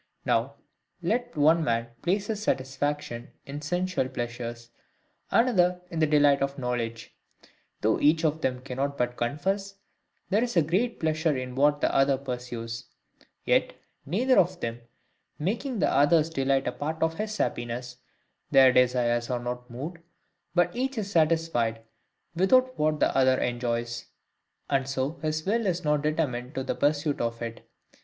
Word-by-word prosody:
Now, - - +1 0.5
let 245 -6 -1
one 160 +3 +4
man 115 -4 0
place 195 +3 0
his 215 -1 -3
satisfaction 135 - -2 0.2
in 145 +2 -6
sensual 175 -3 -1
pleasures, 120 -1 -5 0.6
another 180 -7 +3
in 165 - -3
the 155 - +4
delight 145 -2 +4
of 140 0 -1
knowledge: 120 -3 -3 0.7
though 110 +1 +2
each 160 +2 +3
of 155 +1 0
them 125 -1 -1
cannot 140 +2 -3
but 125 0 -1
confess, 195 +12 -2 0.6
there 210 +4 +3
is 240 -6 -2
great 220 +8 0
pleasure 155 -2 +1
in 130 0 -5
what 145 +2 +3
the - - +1
other 135 0 +4
pursues; 125 -3 -5 0.6
yet, - - +2 0.3
neither 245 - +3
of 175 - +2
them 115 +1 -4 0.6
making 230 - -2
the - - +2
other's 155 +3 +4
delight 135 -2 +1
a - - +1
part 155 +5 -3
of 160 0 -1
HIS 215 0 -3
happiness, 120 +1 -3 0.5
their 130 -1 +7
desires 120 -2 +2
are 125 - 0
not 125 +1 -5
moved, 145 +9 -6 0.6
but 175 0 +2
each 260 +1 -2
is 200 -2 -3
satisfied 155 - +1 0.5
without 255 +8 +4
what 155 0 +1
the - - +2
other 130 -1 +4
enjoys; 120 -1 -2 0.6
and 135 -1 0
so 135 +4 -2
his 155 0 -2
will 220 +2 +1
is 180 -1 -1
not 150 -1 +2
determined 145 -5 -1
to 135 - -2
the - - -1
pursuit 145 0 0
of 115 0 -2
it. 115 -1 -7
145 Hz, 150 wpm, -27 LUFS, 125-170 Hz, 0.7 s, their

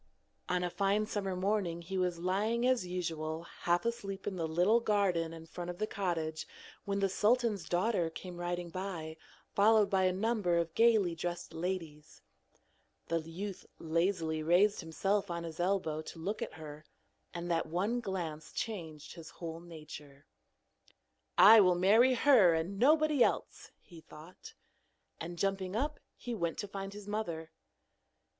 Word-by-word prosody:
On 180 0 +1
a 175 - -2
fine 200 +3 +1
summer 200 -3 -3
morning 185 -3 -1
he 190 +3 -6
was 180 -2 0
lying 205 +7 0
as 255 -8 +1
usual 165 -3 -3
half 175 +2 -1
asleep 200 -5 -3
in 200 - -3
the 165 -3 -2
little 180 +8 +3
garden 195 -7 +1
in 165 0 -10
front 175 +2 -7
of 175 - -5
the 215 - 0
cottage 165 -6 -3 0.4
when 200 0 -1
the 195 - +3
sultan's 210 -2 +1
daughter 180 -1 +1
came 175 +2 -8
riding 175 0 -3
by, 170 -4 -5 0.4
followed 210 0 +4
by 190 -1 +3
a 185 - +3
number 195 -3 +1
of 170 -1 -1
gaily 220 -6 +4
dressed 175 0 -5
ladies. 165 -3 -5 0.9
The 165 - +1
youth 180 +5 -6
lazily 165 -1 0
raised 180 +6 +3
himself 195 +5 -1
on 170 -1 -3
his 165 -1 -7
elbow 175 -4 0
to 160 - -10
look 195 +7 -3
at - - -4
her, 155 -1 -9 0.5
and 175 0 -4
that 165 -1 0
one 200 +9 0
glance 165 -8 -5
changed 160 -8 -5
his 165 -2 -10
whole 165 -1 -7
nature. 150 -4 -11 1.1
'I 220 +1 +10
will 180 -2 +4
marry 220 +8 +5
her 225 - +6
and 175 +5 -3
nobody 300 0 +5
else,' - - -2
he 170 -2 -14
thought. 160 +4 -13 0.6
And 170 +1 -6
jumping 195 0 -1
up, 295 +6 -1 0.2
he 245 - -6
went 170 -7 -2
to 205 - -4
find 195 0 -6
his 205 0 -10
mother. 170 -7 -4
180 Hz, 155 wpm, -32 LUFS, 165-205 Hz, 1.1 s, I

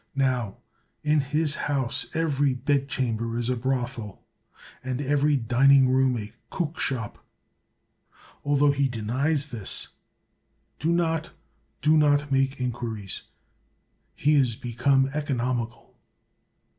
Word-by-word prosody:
Now 125 -7 0 0.5
in 150 0 +3
his 150 +2 0
house 135 -5 -1
every 145 -4 +1
bedchamber 125 -4 -1
is 120 0 -1
a 125 - +1
brothel, 120 -4 -3 0.6
and 130 0 -3
every 145 +1 +2
dining 130 +2 +5
room 130 -1 +3
a 105 -1 -7 0.2
cookshop. 140 - -3 1.2
Altho 145 0 +3
he 140 -1 +1
denies 135 +6 0
this 110 -6 -2 0.5
— - - -45
do 160 +3 +1
not, 165 -1 0 0.5
do 155 +1 +5
not 145 -1 +3
make 135 0 +1
in 125 -1 0
quiries: 110 -5 -5 0.9
he 150 +2 +2
is 130 -6 +3
become 135 +4 +1
economical. 125 -5 -3
135 Hz, 110 wpm, -26 LUFS, 120-145 Hz, 1.2 s, dining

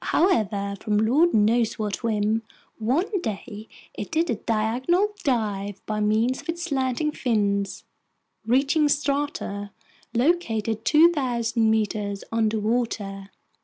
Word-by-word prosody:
However, 210 - +1
from 210 -2 0
lord 270 +11 +3
knows 220 +2 +2
what 210 -2 -3
whim, 220 -1 0 0.4
one 335 - 0
day 215 - -6 0.3
it - - -6
did 325 +1 +1
a - - +1
diagonal 240 - +1
dive 205 -6 -1
by 215 -1 -2
means 220 +5 +1
of - - -15
its 340 +1 -2
slanting 275 -1 0
fins, 200 -7 -1 0.6
reaching 275 +6 +2
strata 280 -8 -1 0.5
located 230 -6 0
2,000 250 -8 +3
meters 210 -2 -1
underwater. 220 -3 -1
225 Hz, 110 wpm, -24 LUFS, 210-280 Hz, 0.6 s, lord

